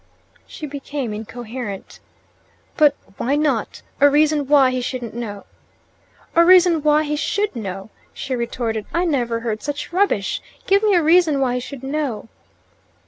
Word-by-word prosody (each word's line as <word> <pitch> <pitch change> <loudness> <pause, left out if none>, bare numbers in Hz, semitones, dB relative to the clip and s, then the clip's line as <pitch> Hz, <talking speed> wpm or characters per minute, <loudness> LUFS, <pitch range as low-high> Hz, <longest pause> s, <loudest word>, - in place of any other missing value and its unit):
She 310 - -8
became 280 -4 -5
incoherent. 225 -1 -7 0.8
"But 295 -4 +4 0.2
WHY 270 +4 0
not? 290 -7 -1 0.2
A 285 - +7
reason 295 -1 +2
why 275 -3 +5
he 255 0 -2
shouldn't 245 -2 -5
know." 215 -4 -6 0.9
"A 335 - +7
reason 355 -2 +6
why 300 +1 +3
he 300 0 -2
SHOULD 405 +4 -1
know," 195 -2 -6 0.2
she 270 -2 -4
retorted. 230 -2 -3
"I 345 +2 +2
never 240 -8 0
heard 220 -2 -3
such 290 +5 -5
rubbish! 365 - +1 0.2
Give 395 +1 +3
me 420 -3 +3
a 345 - +3
reason 320 -2 +4
why 260 -2 +1
he 250 - -1
should 265 +1 -9
know." 270 -6 -3
275 Hz, 150 wpm, -20 LUFS, 235-305 Hz, 0.9 s, A